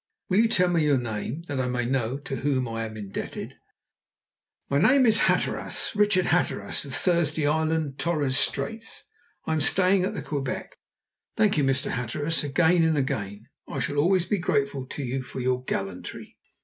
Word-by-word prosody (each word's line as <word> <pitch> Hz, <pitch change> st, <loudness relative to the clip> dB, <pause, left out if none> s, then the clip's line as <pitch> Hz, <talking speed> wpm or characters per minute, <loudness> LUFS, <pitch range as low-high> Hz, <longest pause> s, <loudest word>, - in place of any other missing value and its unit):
"Will 190 Hz, +2 st, +3 dB
you 230 Hz, -, +5 dB
tell 180 Hz, -5 st, +2 dB
me 170 Hz, -3 st, +2 dB
your 145 Hz, -2 st, +3 dB
name, 120 Hz, +5 st, -4 dB
that 145 Hz, -5 st, -4 dB
I 130 Hz, -, 0 dB
may 125 Hz, -1 st, -1 dB
know 130 Hz, 0 st, -1 dB
to 140 Hz, -1 st, -5 dB
whom 130 Hz, -3 st, 0 dB
I 115 Hz, 0 st, -3 dB
am 110 Hz, 0 st, -8 dB
indebted?" 100 Hz, -2 st, -6 dB, 1.1 s
"My 140 Hz, -, +1 dB
name 260 Hz, -, +5 dB
is 220 Hz, -1 st, +4 dB
Hatteras. -, -, 0 dB
Richard 205 Hz, -3 st, +3 dB
Hatteras, 175 Hz, -, 0 dB
of 135 Hz, -, -5 dB
Thursday 170 Hz, -4 st, +1 dB
Island, 155 Hz, -1 st, 0 dB
Torres 150 Hz, -5 st, 0 dB
Straits. 225 Hz, +10 st, -1 dB, 0.4 s
I 160 Hz, -, 0 dB
am 155 Hz, -, 0 dB
staying 185 Hz, +4 st, +4 dB
at 185 Hz, -, -2 dB
the -, -, -4 dB
Quebec." 140 Hz, -3 st, -4 dB, 0.6 s
"Thank 210 Hz, -2 st, +3 dB
you, -, -, +2 dB
Mr. 135 Hz, 0 st, +1 dB
Hatteras, 145 Hz, +7 st, -1 dB
again 160 Hz, +5 st, +3 dB
and 160 Hz, -1 st, +2 dB
again. 110 Hz, -7 st, -3 dB, 0.2 s
I -, -, -6 dB
shall 145 Hz, -, -2 dB
always 175 Hz, +4 st, +3 dB
be 205 Hz, -, 0 dB
grateful 140 Hz, -5 st, -1 dB
to 140 Hz, -, -5 dB
you 130 Hz, +1 st, -2 dB
for 130 Hz, -, -8 dB
your 125 Hz, 0 st, 0 dB
gallantry!" 95 Hz, -5 st, -5 dB
145 Hz, 175 wpm, -26 LUFS, 130-175 Hz, 1.1 s, you